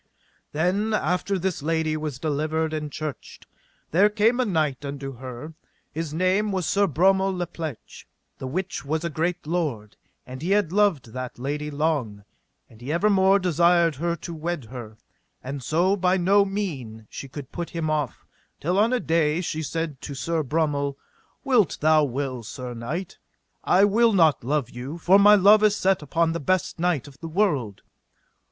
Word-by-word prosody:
Then 195 +8 0
after 180 +2 0
this 185 -3 -2
lady 160 0 0
was 150 -4 -4
delivered 155 +2 -1
and 150 -1 -4
churched, 155 -1 -7 0.5
there 195 +6 +5
came 220 +4 +2
a 255 - +2
knight 155 -8 0
unto 140 -2 -6
her, 130 +5 -8 0.4
his 160 -1 -4
name 185 +6 +1
was 185 -3 -1
Sir 200 +3 +2
Bromel 190 +5 +3
la 175 - -1
Pleche, 160 -7 -8 0.3
the 130 - -5
which 185 +8 -3
was 155 +3 -2
a 170 - -2
great 170 +3 -2
lord; 150 -11 -2 0.3
and 130 +1 -9
he 170 - -3
had 200 -4 +2
loved 185 - +1
that 130 -1 -6
lady 145 +4 -3
long, 140 -9 -1 0.4
and 110 0 -19
he 130 +4 -4
evermore 195 +2 +4
desired 170 -2 +3
her 170 +3 -1
to 170 +1 -8
wed 165 -3 -4
her; 115 -4 -8 0.5
and 135 +1 -5
so 175 +9 +2
by 185 -1 +2
no 200 +3 +4
mean 140 - -5
she 135 - -8
could 135 0 -9
put 175 -1 -5
him 165 -2 -3
off, 150 -4 -2 0.3
till 180 +5 0
on 220 +3 +3
a 250 - +2
day 160 -4 +1
she 160 -3 -3
said 160 -2 -4
to 140 - -6
Sir 165 +4 -1
Bromel: 145 -1 -1 0.5
Wit 245 - +2
thou 155 0 +4
well, 130 -1 -3
sir 125 +3 -7
knight, 150 +11 -5 0.4
I 190 +3 +5
will 225 +2 +3
not 160 -10 +4
love 135 -1 -1
you, 130 +7 -6
for 185 +4 +5
my 205 +1 +8
love 210 +2 +6
is 210 -1 +4
set 190 -3 +1
upon 165 +3 0
the 170 - -3
best 185 +2 -1
knight 170 -6 0
of 140 -1 -15
the 165 - -6
world. 150 - 0
160 Hz, 175 wpm, -24 LUFS, 140-185 Hz, 0.5 s, my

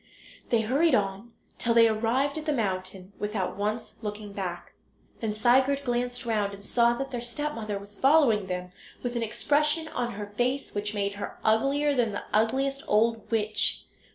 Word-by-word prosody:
They 230 -2 +3
hurried 275 +7 +3
on 200 +2 -2 0.3
till 235 -1 +1
they 230 -1 +7
arrived 245 +7 +1
at 310 - -9
the - - +3
mountain 190 -4 -3
without 210 -3 -2
once 210 +3 -3
looking 210 -1 -6
back. 180 -3 -5 0.5
Then 220 -2 -1
Sigurd 260 +6 +3
glanced 245 -1 -2
round 210 -3 0
and 200 0 -14
saw 235 +1 +3
that 270 +2 -4
their 245 -2 -3
stepmother 235 -4 -3
was 200 +1 -11
following 265 -9 +4
them, 180 0 -4 0.3
with 245 -1 -3
an 235 - 0
expression 295 +8 +1
on 240 -1 -2
her 205 +1 -5
face 245 +7 -2
which 205 +1 -3
made 200 -1 -1
her - - -5
uglier 275 +7 +2
than 235 -5 +1
the 205 - -4
ugliest 270 +6 +1
old 225 +1 +2
witch. 215 -2 +1
225 Hz, 170 wpm, -27 LUFS, 205-260 Hz, 0.5 s, they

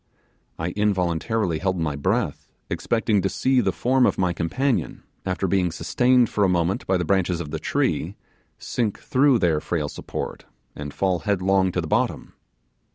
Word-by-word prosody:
I 80 +2 -2
involuntarily 95 -1 0
held 95 -1 0
my 75 -3 -1
breath, 70 - -1 0.2
expecting 110 -3 +1
to 95 - 0
see 130 +3 +2
the - - +1
form 130 +1 +2
of - - 0
my 90 -2 +1
companion, 125 +11 -1 0.2
after 95 +1 -1
being 90 -2 +1
sustained 125 +8 +3
for 105 - 0
a 95 - +4
moment 90 +1 0
by 95 - +3
the 90 - -2
branches 90 -2 +1
of 75 -4 -6
the 80 - -3
tree, - - -1 0.4
sink 110 -5 -2
through 140 -2 +3
their 85 -7 +1
frail 75 -4 -2
support, - - -6 0.3
and 75 0 -6
fall 95 0 0
headlong 95 +1 +1
to 90 - 0
the 80 - -5
bottom. - - -1
95 Hz, 165 wpm, -23 LUFS, 85-110 Hz, 0.4 s, a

